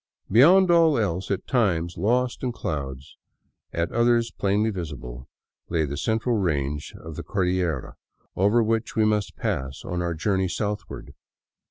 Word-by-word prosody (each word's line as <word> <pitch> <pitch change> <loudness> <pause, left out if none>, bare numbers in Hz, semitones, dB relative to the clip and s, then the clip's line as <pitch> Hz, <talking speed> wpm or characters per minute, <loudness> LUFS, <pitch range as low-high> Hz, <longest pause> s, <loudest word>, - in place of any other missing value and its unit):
Beyond 175 - +6
all 165 -3 +5
else, 95 -4 -1
at 100 - -2
times 90 - +1
lost 120 +7 0
in 125 - -1
clouds, 70 - -5 0.5
at 85 0 -2
others 120 0 +2
plainly 105 +3 +1
visible, 70 - -7 0.4
lay 80 -2 +1
the 70 0 -4
central 110 - 0
range 75 -6 -2
of 80 -1 -9
the - - -5
Cordillera 90 -7 -1 0.4
over 105 +5 +3
which 115 +1 -1
we 110 - +3
must 105 -2 0
pass 65 +1 -3
on 90 0 -2
our 85 -1 -2
journey 95 +3 0
southward. 105 +3 -4
95 Hz, 145 wpm, -25 LUFS, 80-115 Hz, 0.5 s, Beyond